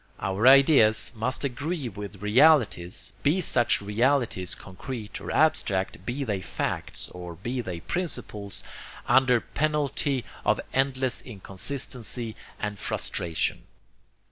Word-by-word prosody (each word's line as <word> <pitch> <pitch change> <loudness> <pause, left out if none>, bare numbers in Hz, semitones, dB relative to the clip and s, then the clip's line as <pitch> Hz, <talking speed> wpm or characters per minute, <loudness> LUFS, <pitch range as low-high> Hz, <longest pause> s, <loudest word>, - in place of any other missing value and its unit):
Our 95 +5 +1
ideas 135 -5 +6
must 120 +6 -1
agree 145 +2 -2
with 100 -1 -8
realities, 110 - +3
be 150 +6 +2
such 120 - +3
realities 110 -3 +1
concrete 105 +3 -7
or - - -6
abstract, 95 - +1
be 130 +3 -2
they 105 -7 -2
facts - - -3
or 90 -1 -8
be 120 +8 -3
they 90 -6 -6
principles, 110 - -3 0.4
under 130 -2 +4
penalty 145 -2 -1 0.2
of - - +2
endless 130 -1 +1
inconsistency 115 +2 -5 0.2
and 105 -1 -4
frustration. 85 -2 -1
120 Hz, 110 wpm, -27 LUFS, 100-135 Hz, 0.4 s, ideas